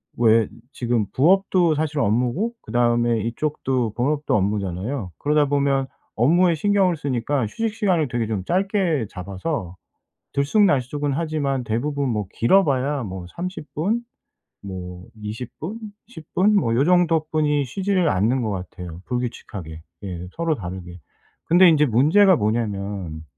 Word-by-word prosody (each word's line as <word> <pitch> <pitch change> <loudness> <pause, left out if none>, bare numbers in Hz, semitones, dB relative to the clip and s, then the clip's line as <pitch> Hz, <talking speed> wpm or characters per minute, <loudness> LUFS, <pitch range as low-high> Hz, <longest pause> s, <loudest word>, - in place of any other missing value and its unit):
왜 115 -2 +4 0.3
지금 120 -5 0
부업도 180 +2 +3
사실 155 0 -2
업무고 125 - +1
그다음에 120 -1 +1
이쪽도 125 -1 -1
본업도 145 +5 0
업무잖아요. 100 +2 -2
그러다 150 0 +2
보면 140 -1 +1 0.3
업무에 170 +9 +4
신경을 190 +1 +2
쓰니까 135 -2 -1
휴식 225 - -3
시간을 185 - +1
되게 120 -2 -1
좀 105 -4 -2
짧게 185 - 0
잡아서 95 - -5 0.6
들쑥날쑥은 145 - +2
하지만 145 -4 -1
대부분 135 +5 -1
뭐 105 -3 -2
길어봐야 140 -2 +2
뭐 95 -3 -6
30 180 -3 -6
분? 210 +10 0 0.6
뭐 90 -2 -8
20 110 +3 -7
분? 205 +9 -6 0.3
10 165 -10 -13
분? 205 +3 +3
뭐 115 - +2
요 135 - +3
정도뿐이 155 -4 +2
쉬지를 185 +5 0
않는 110 +6 +2
것 110 - -1
같아요 90 -3 -7
불규칙하게. 105 -10 -5 0.2
예 90 -2 -6
서로 165 -1 0
다르게. 90 - -7 0.5
근데 175 +2 +6
인제 150 -2 +5
문제가 160 - +5
뭐냐면 100 -7 -2
135 Hz, 280 characters per minute, -22 LUFS, 110-160 Hz, 0.6 s, 근데